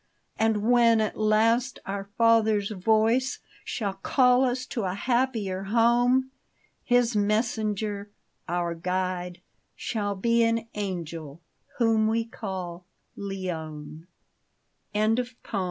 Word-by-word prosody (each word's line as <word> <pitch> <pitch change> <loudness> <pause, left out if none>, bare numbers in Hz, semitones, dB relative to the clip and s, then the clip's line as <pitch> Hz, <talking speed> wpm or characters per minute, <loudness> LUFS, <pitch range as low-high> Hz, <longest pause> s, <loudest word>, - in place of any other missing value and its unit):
And 220 -2 +2
when 235 -2 +5
at 215 -1 -1
last 225 +4 +2
our 195 0 -4
Father's 220 -3 +3
voice 220 +6 +2 0.3
Shall 205 -5 -3
call 250 +6 +3
us 255 0 0
to 240 - -4
a 185 0 -2
happier 220 -5 -1
home, 240 +4 +3 0.5
His 245 -2 +2
messenger 210 -1 -1 0.2
— - - -46
our 170 -1 -1
guide 180 +1 -3 0.2
— - - -47
shall 205 -3 -2
be 230 +4 +2
An 230 0 0
angel 170 -7 -5 0.4
whom 225 -2 +3
we 225 +1 +1
call 185 -6 -6
— - - -47
Leone 160 -5 -6 0.9
1 215 +2 +2
50 245 -2 -3
JUNE. 200 - -3
215 Hz, 120 wpm, -26 LUFS, 190-235 Hz, 0.9 s, when